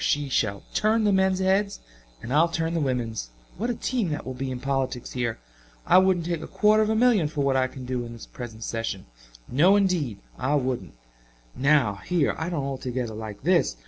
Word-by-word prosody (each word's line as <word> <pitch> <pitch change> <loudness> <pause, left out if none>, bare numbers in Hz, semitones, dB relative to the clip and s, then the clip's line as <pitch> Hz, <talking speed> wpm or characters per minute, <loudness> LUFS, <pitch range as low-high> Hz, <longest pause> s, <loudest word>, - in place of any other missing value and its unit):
She 145 -1 +1
shall 105 -6 0
turn 220 +1 +2
the 205 -1 +3
men's 190 -1 +3
heads 195 +2 +1 0.4
and 125 - -4
I'll 160 +3 +5
turn 165 0 -2
the 170 - 0
women's! 120 - -2 0.3
What 235 +4 -1
a 240 - 0
team 235 -8 -1
that 150 -1 -4
will 130 - -4
be 130 +1 -4
in 130 -1 -4
politics 135 -2 -2
here. 120 -3 -2 0.5
I - - +7
wouldn't 185 -3 +2
take 170 -2 -2
a - - -6
quarter 215 0 +3
of 215 - +1
a 220 - +2
million 220 -8 +4
for 150 -1 -3
what 135 -1 +2
I 130 0 +3
can 130 0 -9
do 125 -1 -2
in 120 0 -8
this 115 - -10
present 115 -3 -8
session 115 -5 -3 0.4
no 170 +10 +5
indeed 180 - +1 0.2
I 135 +3 +1
wouldn't. 130 - -2 0.6
Now, 135 -7 +3
here 175 -5 +1
I 160 +1 -2
don't 155 -6 -2
altogether 130 -3 -3
like 110 -1 -7
this. 170 - +2
140 Hz, 210 wpm, -25 LUFS, 125-185 Hz, 0.6 s, I